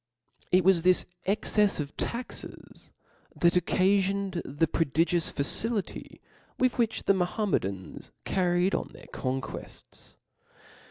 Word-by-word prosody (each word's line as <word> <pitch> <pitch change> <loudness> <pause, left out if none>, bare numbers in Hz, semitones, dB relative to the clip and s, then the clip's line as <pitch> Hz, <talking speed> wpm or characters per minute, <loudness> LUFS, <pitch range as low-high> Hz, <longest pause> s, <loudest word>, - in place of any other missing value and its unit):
T 180 - +6
T - - +4
was 185 -1 +4
tKis 180 +1 +3 0.2
excefs 205 0 +2
of 145 -1 -4
tatxes 240 +2 -6 0.2
* - - -33
that 170 0 +4
occafioned 190 +1 +1
the 145 +4 0
•*• - - -29
prodigious 165 +2 +1
facility 205 +9 -1 0.4
with 255 -1 +1
which 225 -2 0
the 195 - +4
Mahometan^ 180 - -2 0.2
carried 180 0 +1
on - - -1
their - - -13
conquers. 130 0 -6
185 Hz, 120 wpm, -28 LUFS, 165-200 Hz, 0.4 s, T